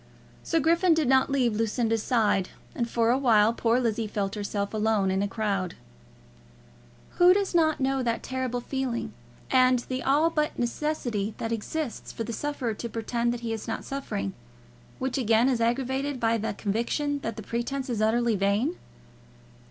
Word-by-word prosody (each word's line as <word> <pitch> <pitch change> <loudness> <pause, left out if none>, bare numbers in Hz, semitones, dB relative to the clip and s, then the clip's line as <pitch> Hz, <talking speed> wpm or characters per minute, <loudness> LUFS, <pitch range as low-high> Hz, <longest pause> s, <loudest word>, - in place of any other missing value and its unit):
Sir 330 - 0
Griffin 335 +3 +4
did 315 -4 +1
not 265 +1 +4
leave 255 -5 +2
Lucinda's 225 0 0
side, 215 -6 +1 0.2
and 235 -1 -2
for 230 0 +2
a 255 - +2
while 225 -4 +4
poor 230 +1 +2
Lizzie 230 -2 0
felt 200 -1 -2
herself 205 -1 -3
alone 215 -3 +1
in 190 +1 +1
a 205 - +1
crowd. 195 -4 -2 1.4
Who 355 +1 +7
does 400 -2 0
not 315 -2 +3
know 270 0 +1
that 235 -2 -1
terrible 255 -2 -2
feeling, 260 -2 -3 0.4
and 255 -1 +5
the 255 0 -2
all 295 +6 +3
but 300 -1 -1
necessity 240 -5 -2
that 225 - -3
exists 240 +4 -4
for 230 - -4
the 230 +1 -5
sufferer 275 -4 -2
to 235 +3 -6
pretend 235 +1 -1
that 240 0 -4
he 230 -1 -2
is 220 - -6
not 225 - -4
suffering, 100 - -4 0.6
which 260 +1 -2
again 230 0 +3
is 250 -3 +1
aggravated 265 +3 0
by 230 0 +2
the 215 -1 -3
conviction 235 +9 -1
that 230 -4 -4
the 220 - -7
pretence 245 +5 -3
is 235 -4 -2
utterly 230 +1 +2
vain? 205 - +1
235 Hz, 170 wpm, -27 LUFS, 220-270 Hz, 1.4 s, Who